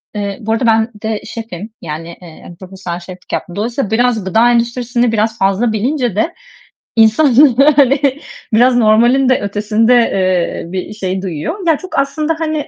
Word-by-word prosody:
Eee 200 -1 -3
bu 220 0 -3
arada 230 +2 -1
ben 225 0 +2
de 220 -1 -2
şefim. 220 -3 -7
Yani, 160 +1 -6
eee, 175 0 -13
profesyonel 185 -2 -7
şeflik 180 +1 -11
yaptım. 175 - -4
Dolayısıyla 225 +1 -3
biraz 235 -1 +1
gıda 225 +5 +3
endüstrisini 240 0 0
biraz 220 +1 -1
fazla 195 +3 +1
bilince 245 - -1
de, 270 +11 0 0.6
insan, 225 +5 +4 0.4
yani, 275 +1 +2 0.3
biraz 245 +3 +4
normalin 240 +4 +3
de 255 - +3
ötesinde, 210 +3 +1
eee, 185 -7 0
bir 190 +2 -5
şey 190 -2 -3
duyuyor. 195 - -5
Ya 320 -3 +3
çok 370 -6 -4
aslında 305 +3 -1
hani 310 -2 -2
225 Hz, 155 wpm, -15 LUFS, 195-250 Hz, 0.6 s, insan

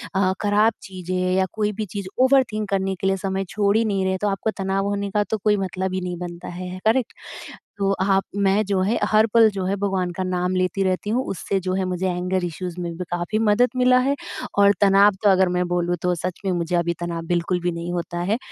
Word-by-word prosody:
अ, 190 -1 +3
ख़राब 210 +2 +3
चीज़ें 185 -2 -6 0.2
या 190 - +3
कोई 210 -1 0
भी 215 - -1
चीज़ 200 -2 -4 0.2
ओवरथिंक 255 -6 +2
करने 195 -1 0
के 190 - -2
लिए 195 0 +1
समय 195 0 -2
छोड़ 200 -1 +1
ही 230 - +3
नहीं 195 -3 0
रहे 190 0 0
तो 210 - +1
आपको 200 +2 -1
तनाव 195 0 -1
होने 200 0 -2
का 210 +1 +2
तो 220 - 0
कोई 210 -1 +3
मतलब 190 -1 -3
ही 185 - -2
नहीं 180 -1 -4
बनता 175 0 -7
है। 175 - -7
है 185 +1 -7
करेक्ट? 230 +1 +2 0.6
तो 195 -1 +1
आप 195 0 +2
मैं 200 +1 +2
जो 195 -1 0
है, 205 +5 +1
हर 215 +1 +5
पल 225 -2 +7
जो 195 -2 -3
है 195 +2 0
भगवान 190 -3 -1
का 185 - -1
नाम 180 0 -1
लेती 185 +1 0
रहती 185 +2 -1
हूँ 250 +4 +1
उससे 195 +1 -2
जो 185 0 -3
है 190 -1 0
मुझे 185 +1 -2
एंगर 180 +1 -1
इश्यूज़ 175 +1 -5
में 175 -1 -3
भी 180 - -3
काफ़ी 175 +5 -1
मदद 225 +3 +3
मिला 250 0 +5
है। 275 +2 +1 0.4
और 200 0 +6
तनाव 200 +1 +6
तो 205 - +5
अगर 190 -1 +4
मैं 180 0 0
बोलूँ 175 0 0
तो 180 0 +1
सच 175 +1 -4
में 190 - +1
मुझे 175 0 -1
अभी 170 0 +1
तनाव 170 -1 -3
बिल्कुल 175 +1 0
भी 175 - 0
नहीं 170 +1 -5
होता 175 0 -3
है। 220 - +2
190 Hz, 240 wpm, -22 LUFS, 180-205 Hz, 0.6 s, पल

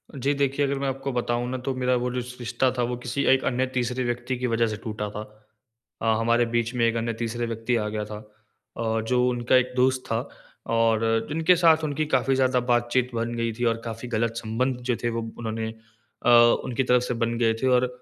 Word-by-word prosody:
जी। 140 +2 0
देखिए 140 0 +1
अगर 140 0 -1
मैं 140 - -1
आपको 135 +1 -3
बताऊँ 120 0 -1
ना 130 - -2
तो 135 - 0
मेरा 125 0 +1
वो 125 0 -1
जो - - -6
रिश 125 0 -4
रिश्ता 125 +2 0
था 120 - +1
वो 120 +1 -1
किसी 135 +3 -1
1 135 - +1
अन्य 130 +1 +1
तीसरे 125 0 -1
व्यक्ति 120 +1 -2
की 125 - -1
वजह 115 -1 +2
से 110 -1 -4
टूटा 105 -2 -4
था। 105 +1 -6 0.8
अ, - - -3
हमारे 115 +1 +3
बीच 120 +1 0
में 120 -1 +2
1 115 - 0
अन्य 115 0 -1
तीसरे 115 +1 -3
व्यक्ति 115 +2 -1
आ 105 -2 0
गया 105 0 -3
था 105 0 -8 0.6
और 110 0 0
जो 125 +2 +2
उनका 120 +1 +1
1 125 0 +2
दोस्त 130 0 +2
था। 115 0 -2 0.5
और 115 0 +2
जिनके 160 +4 +3
साथ 165 -2 +4
उनकी 155 +1 -1
काफ़ी 135 -2 +1
ज़्यादा 130 -1 +2
बातचीत 120 +1 +1
बन 115 +1 -2
गई 115 -1 -1
थी 120 +3 -5
और 115 0 +2
काफ़ी 115 +1 -6
गलत 115 0 0
संबंध 125 +3 -1
जो 120 - +3
थे 120 - +1
वो 115 0 -2 0.2
उन्होंने 110 -1 -3 0.6
अ, - - +5 0.4
उनकी 130 +2 -1
तरफ 125 0 +3
से 125 - -2
बन 115 0 0
गए 115 -2 +2
थे। 130 - +3
और 125 0 +4
120 Hz, 225 wpm, -25 LUFS, 115-130 Hz, 0.8 s, अ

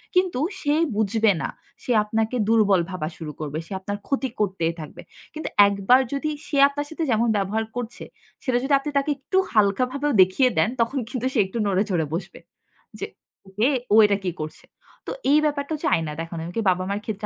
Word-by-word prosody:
কিন্তু 365 -7 +2 0.2
সে 290 -3 +1 0.2
বুঝবে 220 +1 +2
না। - - -2 0.3
সে - - -2
আপনাকে 220 +3 -1
দুর্বল 210 -5 +4
ভাবা 185 -5 -3
শুরু 155 -2 -6
করবে। 150 -1 -4
সে - - -21
আপনার 205 +2 -4
ক্ষতি 270 -1 -1
করতেই 185 -5 0
থাকবে। 155 -2 -9 0.3
কিন্তু 310 +1 -5 0.2
একবার 200 +5 +4
যদি 280 +2 -1 0.2
সে 290 - -2
আপনার 290 +1 -4
সাথে 320 +1 -4
যেমন 230 +1 +2
ব্যবহার 205 +3 -1
করছে, 240 -1 -5 0.4
সেটা 255 -3 +1
যদি 275 +2 0
আপনি 295 - -5
তাকে 280 +2 +1
একটু 275 +8 -2 0.2
হালকাভাবেও 255 +7 +2
দেখিয়ে 185 +8 +4
দেন - - +3
তখন 230 +5 0
কিন্তু 255 -1 -3
সে 240 - +1
একটু 190 +5 -6
নড়ে 195 0 +2
চড়ে 170 -5 +1
বসবে। 175 +3 -5 0.6
যে - - -2 0.6
এ - - +3 0.2
ও - - +7
এটা 205 -1 +2
কি 180 - -1
করছে? 155 0 -7 0.4
তো - - -3 0.2
এই 295 - +6
ব্যাপারটা 285 0 -1
হচ্ছে 305 +1 -1
আয়না 160 -2 -3
দেখানো। 165 0 -6
এমন 170 +2 -7
কি - - +2
বাবা-মার 185 +3 -1
ক্ষেত্রে 210 -1 -4
220 Hz, 190 wpm, -24 LUFS, 190-270 Hz, 0.6 s, ও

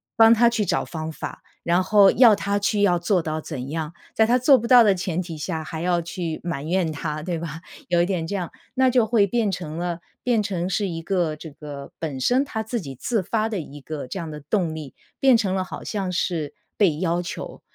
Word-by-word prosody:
帮 225 0 +7
他 235 +1 +5
去 230 -2 0
找 - - 0
方 160 -1 -5
法， - - -7 0.2
然 175 +2 +2
后 200 0 +6
要 230 -4 +7
他 200 0 -1
去 205 +1 0
要 180 -4 +4
做 180 +1 +1
到 155 -1 -3
怎 135 -4 -6
样， 160 +1 -4 0.2
在 220 - +5
他 245 +3 +3
做 265 +2 +6
不 235 - -4
到 245 0 +8
的 205 -3 +4
前 180 -1 -2
提 170 -3 -7
下 160 +1 -3
还 160 0 -6
要 175 0 +1
去 170 -1 -4
埋 165 -5 -3
怨 175 -1 +1
他， 155 0 -4
对 170 +1 -3
吧？ 165 0 -6 0.3
有 175 -1 +3
一 - - +3
点 180 -4 -1
这 200 +5 -3
样， 180 -3 -3 0.2
那 260 0 +3
就 245 -2 +3
会 215 -2 +3
变 220 0 +1
成 165 -4 -5
了 175 0 -2 0.2
变 240 -3 +2
成 185 -4 -2
是 200 +1 0
一 165 -1 -4
个 175 -4 0
这 155 +1 -10
个 145 -1 -9
本 150 -5 -4
身 250 - +3
他 220 -6 -4
自 225 +1 -3
己 135 -5 -8
自 220 - -1
发 215 +4 0
的 210 - -2
一 145 -2 -9
个 145 -2 -6
这 160 - -6
样 165 -3 -5
的 150 - -7
动 160 +2 -1
力， 150 -4 -8 0.2
变 265 -3 +6
成 195 -4 0
了 190 -1 0
好 - - -8
像 195 -4 -3
是 165 -5 -2 0.2
被 180 -8 +3
要 170 0 0
求。 175 - -7
180 Hz, 255 characters per minute, -23 LUFS, 160-210 Hz, 0.3 s, 到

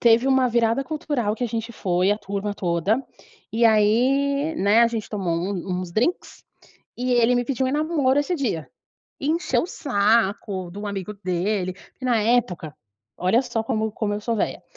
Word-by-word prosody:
teve 235 +2 +4
uma 265 -1 +4
virada 235 +2 +1
cultural 290 -8 -2
que 245 - -3
a - - 0
gente 230 +1 -4
foi 185 -2 +1
a 210 - -3
turma 200 0 -4
toda 190 +8 0 0.5
e 230 +2 +2
aí, 265 +8 +3
né, 205 +1 +4
a - - +6
gente 225 -2 -4
tomou 190 -5 -2
um 180 +1 -2
uns 180 -2 -7
drinks 250 - -1 0.5
e 250 +1 -1
ele 240 0 +4
me 245 0 0
pediu 265 0 0
em - - -1
namoro 295 -2 +2
esse 320 +5 -1
dia. 220 - -2 0.5
Encheu 315 +5 +1
o - - -3
saco 205 - 0
do 205 +4 -6
amigo 200 0 -4
dele, 185 0 -1
porque 255 - -15
na 240 -3 +2
época, 200 -10 0 0.4
olha 205 +8 +2
só 225 -3 -2
como 220 -2 -1
como 205 -1 -2
eu 205 - -4
sou 230 +2 -1
velha. - - -2
225 Hz, 180 wpm, -23 LUFS, 200-255 Hz, 0.5 s, a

